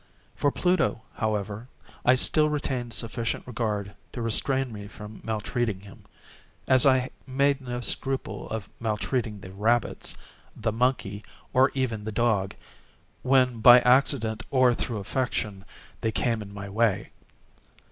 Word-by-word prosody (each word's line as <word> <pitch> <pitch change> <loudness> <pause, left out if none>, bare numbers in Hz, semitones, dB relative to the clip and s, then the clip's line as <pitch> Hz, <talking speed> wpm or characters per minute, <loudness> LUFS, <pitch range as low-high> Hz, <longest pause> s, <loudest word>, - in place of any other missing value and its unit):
For 145 - +2
Pluto, 180 -11 +1
however, 105 +1 -3 0.4
I 125 - +5
still 150 +4 +3
retained 130 -5 -2
sufficient 115 0 -2
regard 105 -4 -3 0.2
to 120 - -5
restrain 130 +3 +3
me 100 -1 -8
from 105 0 -11
maltreating 110 -1 -2
him, 100 0 -15 0.6
as 130 +1 +5
I 130 -1 +3 0.2
made 140 +1 +1
no 125 -1 -4
scruple 135 +2 -3
of 110 -3 -4
maltreating 110 -1 -2
the 95 - -10
rabbits, 110 +4 0 0.4
the 110 0 -1
monkey, 110 -4 -1 0.3
or 130 +2 +5
even 120 -6 -1
the 110 - -4
dog, 105 -4 0 0.7
when 125 -2 +3
by 120 +2 +9
accident, 115 -4 +2
or 130 -2 +4
through 115 -1 -3
affection, 105 -2 -2 0.4
they 110 - 0
came 115 +1 0
in 100 -1 -9
my 100 0 -7
way. 105 0 0
115 Hz, 135 wpm, -26 LUFS, 105-130 Hz, 0.7 s, by